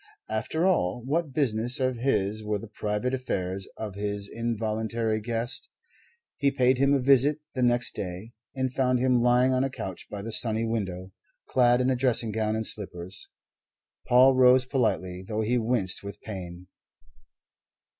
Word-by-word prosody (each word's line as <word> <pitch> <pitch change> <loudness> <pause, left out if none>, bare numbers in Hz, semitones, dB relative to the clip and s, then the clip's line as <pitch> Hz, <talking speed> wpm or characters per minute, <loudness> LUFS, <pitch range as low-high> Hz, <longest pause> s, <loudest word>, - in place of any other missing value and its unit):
After 115 +10 -1
all, 120 - +1
what 155 +2 -1
business 125 -3 +1
of 130 -2 0
his 110 -4 0
were 105 0 -1
the 100 - -9
private 105 +3 -3
affairs 95 -7 -3
of 110 -3 -5
his 100 0 -2
involuntary 110 0 -2
guest? 120 - -1 0.7
He 140 - +2
paid 130 -1 +2
him 140 +1 +4
a - - +2
visit 140 +3 +4 0.2
the 130 - -3
next 120 -1 +2
day, 95 +4 -6 0.2
and 130 -1 -2
found 125 -1 +2
him 125 -1 +2
lying 125 +2 +3
on 130 +1 +2
a 135 - 0
couch 95 -8 -7
by 100 -1 -6
the 115 - -5
sunny 110 0 +1
window, 95 -5 -3 0.4
clad 125 0 +3
in 130 +1 +2
dressing 120 -3 +2
gown 110 0 -1
and 110 0 -2
slippers. 95 -4 -3 0.8
Paul 130 +2 +6
rose 130 0 +5
politely, 100 -9 -1
though 110 0 -2
he 120 +3 +1
winced 110 -5 0
with 100 0 -8
pain. 90 -4 -8
115 Hz, 155 wpm, -27 LUFS, 105-130 Hz, 0.8 s, Paul